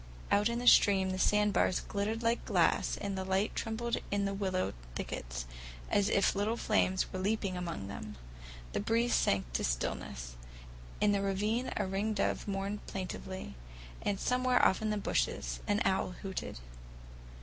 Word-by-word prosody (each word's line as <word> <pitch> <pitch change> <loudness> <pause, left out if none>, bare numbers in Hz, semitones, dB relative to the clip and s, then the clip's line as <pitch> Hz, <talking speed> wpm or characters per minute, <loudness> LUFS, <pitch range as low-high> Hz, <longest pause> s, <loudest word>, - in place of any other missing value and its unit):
Out 205 +2 +4
in 235 - -1
the 245 - -3
stream 190 -5 +6
the 185 - -3
sandbars 210 -2 +3
glittered 220 +3 -2
like 230 +1 +1
glass, - - +2
and 200 -1 -3
the 190 - -2
light 190 +2 0
trembled 235 +1 -1
in 200 0 0
the 195 - -1
willow 190 -2 -1 0.2
thickets - - -4 0.5
as 205 -1 +3
if 200 - +3
little 210 +3 0
flames 190 -5 +1
were 185 - -3
leaping 195 -1 0
among 170 - -4
them. 105 +1 -7 0.6
The - - 0
breeze 235 +2 +1
sank 95 -12 +1
to - - 0
stillness. - - -2 0.7
In 210 - +4
the 200 -1 +2
ravine 210 +6 0
a 205 - +1
ringdove 200 +3 -1
mourned 200 +1 -3
plaintively, 185 - -5 0.5
and 200 -1 -1
somewhere 250 0 +3
off 190 - +3
in 215 - 0
the 210 - 0
bushes 200 - -1
an 205 +1 +2
owl 190 -1 +1
hooted. 190 -1 -4
200 Hz, 160 wpm, -32 LUFS, 185-215 Hz, 0.7 s, stream